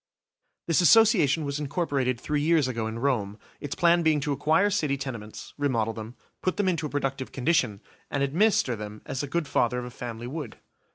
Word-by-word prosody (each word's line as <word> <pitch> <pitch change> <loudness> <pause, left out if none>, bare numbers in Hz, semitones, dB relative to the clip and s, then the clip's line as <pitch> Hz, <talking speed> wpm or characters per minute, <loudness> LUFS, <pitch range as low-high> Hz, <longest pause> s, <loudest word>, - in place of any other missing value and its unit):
This 165 +1 +2
Association 175 - +5
was 140 +1 -3
incorporated 140 -5 -1
three 150 +3 -1
years 155 -2 +3
ago 115 -3 -2
in 110 +1 -5
Rome, 115 -6 -1 0.2
its 145 -1 -5
plan 170 0 +4
being 160 -2 +3
to 145 0 -2
acquire 160 +8 +2
city 150 -8 0
tenements, 115 -6 -7
remodel 115 -6 0
them, 110 +2 -8 0.3
put 185 - -1
them 205 -2 +1
into 165 -4 0
a - - -10
productive 135 -2 -3
condition, 125 -7 0 0.3
and 140 -1 -1
administer 150 - +2
them 105 0 -8
as 130 - -3
a 145 - -4
good 165 +2 -2
father 125 -2 +1
of 125 - -3
a 125 - -8
family 120 -1 -7
would. 140 -2 -6
140 Hz, 190 wpm, -26 LUFS, 120-160 Hz, 0.3 s, Association